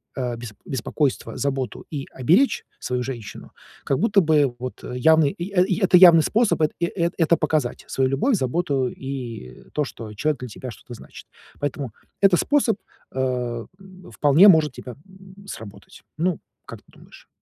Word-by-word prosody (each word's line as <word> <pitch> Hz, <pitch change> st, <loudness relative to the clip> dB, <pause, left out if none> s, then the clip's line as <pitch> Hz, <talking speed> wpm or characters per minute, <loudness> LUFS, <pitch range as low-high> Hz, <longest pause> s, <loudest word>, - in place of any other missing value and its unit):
э, 125 Hz, -2 st, -2 dB
бес 115 Hz, -3 st, -8 dB
беспокойство, 135 Hz, +2 st, -2 dB
заботу 135 Hz, -4 st, -3 dB
и 140 Hz, -2 st, -4 dB
оберечь 180 Hz, -, +3 dB
свою 125 Hz, 0 st, -2 dB
женщину, 120 Hz, -5 st, -8 dB, 0.3 s
как 135 Hz, -, 0 dB
будто 210 Hz, -3 st, +3 dB
бы 150 Hz, -5 st, +2 dB
вот 125 Hz, 0 st, -7 dB
явный 150 Hz, +4 st, +3 dB
и, 180 Hz, +4 st, -7 dB
э, 180 Hz, -2 st, +4 dB
и 190 Hz, -1 st, -1 dB
это 190 Hz, -1 st, +4 dB
явный 170 Hz, -3 st, +8 dB
способ, 220 Hz, -4 st, +1 dB
это 155 Hz, -, +2 dB
и, 170 Hz, -, +1 dB
э 170 Hz, -1 st, -1 dB
это 165 Hz, +1 st, +3 dB
показать 155 Hz, -5 st, -1 dB
свою 130 Hz, -1 st, 0 dB
любовь, 215 Hz, -, +1 dB
заботу 135 Hz, -3 st, 0 dB
и, 125 Hz, -, -7 dB
э, -, -, -21 dB
то, 150 Hz, -1 st, 0 dB
что 110 Hz, -4 st, -9 dB
человек 150 Hz, +6 st, -1 dB
для 125 Hz, -, -6 dB
тебя 125 Hz, +3 st, -8 dB
что-то 120 Hz, -, -12 dB
значит. -, -, -13 dB, 0.3 s
Поэтому 140 Hz, -4 st, -4 dB, 0.3 s
этот 195 Hz, -3 st, +5 dB
способ, 270 Hz, -8 st, +2 dB, 0.3 s
э, 125 Hz, -3 st, -2 dB
м, 185 Hz, -1 st, -15 dB
вполне 150 Hz, +7 st, +5 dB
может 160 Hz, -5 st, +5 dB
тебе, 125 Hz, -2 st, -9 dB
м, 190 Hz, +1 st, -16 dB
сработать. 100 Hz, -, -11 dB
Ну, 170 Hz, +1 st, 0 dB, 0.3 s
как -, -, -10 dB
ты -, -, -31 dB
думаешь? -, -, -18 dB
145 Hz, 170 wpm, -23 LUFS, 125-180 Hz, 0.3 s, явный